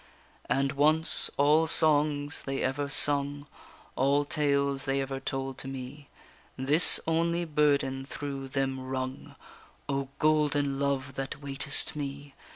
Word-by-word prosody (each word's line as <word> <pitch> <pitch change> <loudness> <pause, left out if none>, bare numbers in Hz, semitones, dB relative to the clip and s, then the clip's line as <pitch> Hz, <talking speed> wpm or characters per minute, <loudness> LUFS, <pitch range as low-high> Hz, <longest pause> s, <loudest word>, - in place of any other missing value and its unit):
And 135 0 0
once, 155 +3 +2
all 150 +3 +3
songs 150 -2 +2
they 135 0 -4
ever 140 +2 -2
sung, 145 0 +4 0.5
All 140 +2 +1
tales 140 -2 -1
they 135 0 -1
ever 135 0 -4
told 135 0 -5
to - - -8
me, 135 +2 -9 0.5
This 145 +6 +6
only 170 +1 0
burden 140 -3 0
through 140 -2 -6
them 135 0 -3
rung: 130 0 -6 0.5
_O 140 -1 -2
golden 145 -3 +1
love 140 -1 -2
that 135 +2 -5
waitest 140 +1 -1
me! 140 -1 -7
140 Hz, 125 wpm, -28 LUFS, 135-145 Hz, 0.5 s, This